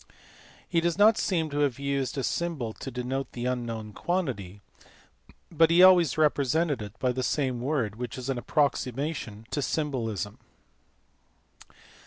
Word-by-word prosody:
He 170 -2 +1
does 170 0 0
not 210 +2 +6
seem 165 -6 0
to 145 - -2
have 140 -4 +1
used 140 -1 -2
a 135 - -1
symbol 150 -11 -2
to 135 - -7
denote 130 +2 -4
the 120 0 -4
unknown 115 -4 -3
quantity, 120 - -3 0.9
but 165 0 +4
he 170 +2 +6
always 180 -5 +6
represented 150 -1 +2
it 105 +3 -8
by 125 - +1
the 130 +1 -2
same 130 -2 -1
word, 125 -6 -1
which 120 -2 -5
is 130 0 -6
an 135 -2 -1
approximation 135 -5 -1
to 145 - -1
symbolism. 115 - -2
135 Hz, 145 wpm, -27 LUFS, 120-155 Hz, 0.9 s, not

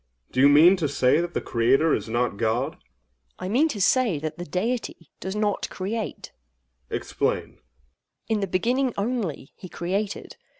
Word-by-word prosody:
Do 130 - -2
you 140 +2 +7
mean 165 +7 +7
to 160 -4 0
say 130 +3 +3
that 175 0 -5
the - - 0
Creator 130 +7 +2
is - - -2
not 120 -1 0
God? 115 +4 0
AGATHOS. - - -27 0.6
I 185 - -5
mean 265 +10 +3
to 235 -10 -4
say 225 - +3
that 155 +2 -5
the 175 - -4
Deity 185 - -3
does 190 +2 -4
not 210 -1 -1
create. 210 +4 -4 0.6
OINOS. - - -1
Explain. - - -1
AGATHOS. - - -24 0.7
In 220 -1 +1
the 195 - -1
beginning 245 +8 +1
only, 200 - -3
he 185 - -11
created. 195 +5 -3
185 Hz, 175 wpm, -25 LUFS, 145-215 Hz, 0.7 s, you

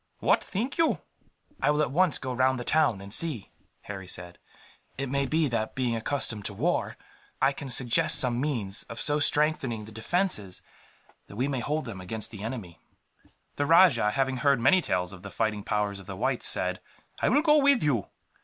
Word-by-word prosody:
What - - +2
think 240 - -4
you?" 330 - +3 0.6
"I - - +2
will 150 +1 +2
at 130 - -2
once 180 +2 +3
go 130 -2 -5
round 130 +1 +2
the - - -4
town, 145 -9 +1
and 100 +1 -9
see," 145 -11 0 0.3
Harry 95 -2 -8
said. 90 -1 -6 0.6
"It 135 0 -3
may 140 0 0
be 155 +2 +1
that, 110 -2 -2
being 125 -3 0
accustomed 115 -2 -2
to - - -1
war, - - -1 0.4
I 135 +1 +3
can 140 0 -8
suggest 125 -2 +2
some 125 -1 +2
means 115 -9 -1
of 115 - -7
so 145 +6 +2
strengthening 145 -7 +1
the 110 - -12
defences 110 - 0 0.6
that - - -12
we 125 +5 0
may 135 -3 -2
hold 150 +5 -2
them 105 -6 -7
against 110 +4 -2
the 105 -4 -9
enemy." 105 -7 -6 0.8
The 145 - 0
rajah, 165 - +5
having 130 +3 0
heard 140 -1 +2
many 185 +10 +4
tales 90 - -1
of 90 - -11
the 100 - -8
fighting 105 +2 -1
powers 105 -1 -1
of 95 - -14
the 95 -1 -7
whites, - - +1
said: - - 0 0.4
"I - - +2
will 290 +4 +3
go 300 -2 +5
with 280 - +4
you. 130 -9 0
125 Hz, 195 wpm, -27 LUFS, 105-150 Hz, 0.8 s, rajah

